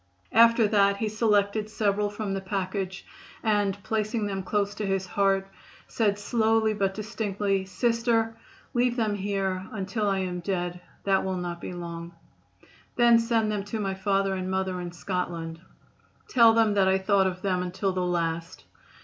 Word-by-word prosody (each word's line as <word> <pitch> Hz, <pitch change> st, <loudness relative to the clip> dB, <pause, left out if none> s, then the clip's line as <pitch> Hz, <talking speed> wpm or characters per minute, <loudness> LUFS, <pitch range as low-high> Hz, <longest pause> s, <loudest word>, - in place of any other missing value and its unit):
After 230 Hz, 0 st, +6 dB
that 200 Hz, -1 st, +3 dB
he 220 Hz, -, -1 dB
selected 210 Hz, -1 st, +1 dB
several 210 Hz, -1 st, 0 dB
from 205 Hz, -1 st, -4 dB
the 195 Hz, -, -2 dB
package 190 Hz, -1 st, -3 dB, 0.4 s
and 205 Hz, -3 st, +1 dB
placing 215 Hz, +1 st, -1 dB
them 195 Hz, -1 st, -2 dB
close 205 Hz, +1 st, -1 dB
to 210 Hz, 0 st, -4 dB
his 195 Hz, -1 st, 0 dB
heart 195 Hz, 0 st, +1 dB, 0.4 s
said 205 Hz, -3 st, +1 dB
slowly, 220 Hz, 0 st, +2 dB
but 195 Hz, -2 st, -1 dB
distinctly: 205 Hz, -3 st, -2 dB
"Sister, 230 Hz, +2 st, +1 dB, 0.4 s
leave 245 Hz, 0 st, +2 dB
them 220 Hz, -4 st, 0 dB
here 195 Hz, -2 st, -2 dB
until 210 Hz, 0 st, -2 dB
I 195 Hz, -, +1 dB
am 180 Hz, -2 st, -2 dB
dead. 175 Hz, -1 st, -3 dB, 0.2 s
That 195 Hz, -1 st, +2 dB
will 190 Hz, -1 st, -2 dB
not 175 Hz, -1 st, -4 dB
be -, -, -5 dB
long. 170 Hz, -1 st, -7 dB, 0.8 s
Then 235 Hz, -1 st, +6 dB
send 230 Hz, -2 st, +1 dB
them 205 Hz, -2 st, -2 dB
to 220 Hz, +2 st, -4 dB
my 195 Hz, -2 st, -1 dB
father 195 Hz, 0 st, 0 dB
and 185 Hz, -1 st, -3 dB
mother 190 Hz, -1 st, -1 dB
in 175 Hz, -1 st, -5 dB
Scotland. 170 Hz, -2 st, -4 dB, 0.7 s
Tell 230 Hz, -3 st, +6 dB
them 225 Hz, -2 st, +3 dB
that 195 Hz, -2 st, +3 dB
I 190 Hz, 0 st, +4 dB
thought 190 Hz, 0 st, +3 dB
of 185 Hz, 0 st, -5 dB
them 185 Hz, -2 st, +1 dB
until 185 Hz, +2 st, -2 dB
the 185 Hz, -, -1 dB
last. 170 Hz, -1 st, -2 dB
200 Hz, 165 wpm, -27 LUFS, 185-215 Hz, 0.8 s, After